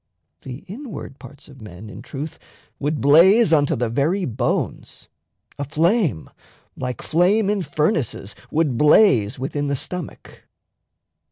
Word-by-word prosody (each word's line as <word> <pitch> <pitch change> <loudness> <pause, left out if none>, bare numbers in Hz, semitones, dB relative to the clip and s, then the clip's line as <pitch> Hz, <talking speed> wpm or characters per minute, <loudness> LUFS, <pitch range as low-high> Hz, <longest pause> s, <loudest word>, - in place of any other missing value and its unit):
The 130 +1 -9
inward 215 - -9
parts 145 - -13
of 135 -4 -15
men, 105 0 -11
In 105 +1 -10
truth, 140 +5 -7 0.4
would 150 +1 -2
blaze 170 - +5
unto 145 -2 +3
the 120 0 -1
very 150 - 0
bones; 120 0 -3 0.5
A - - -1
flame, 155 - 0 0.5
like 125 -2 -5
flame 195 +5 +2
in 205 -2 -1
furnaces, 150 - -2 0.2
would 150 -6 0
blaze 145 - +4
Within 145 +2 -3
the 140 - 0
stomach. 180 +4 -8
145 Hz, 125 wpm, -21 LUFS, 125-175 Hz, 0.5 s, blaze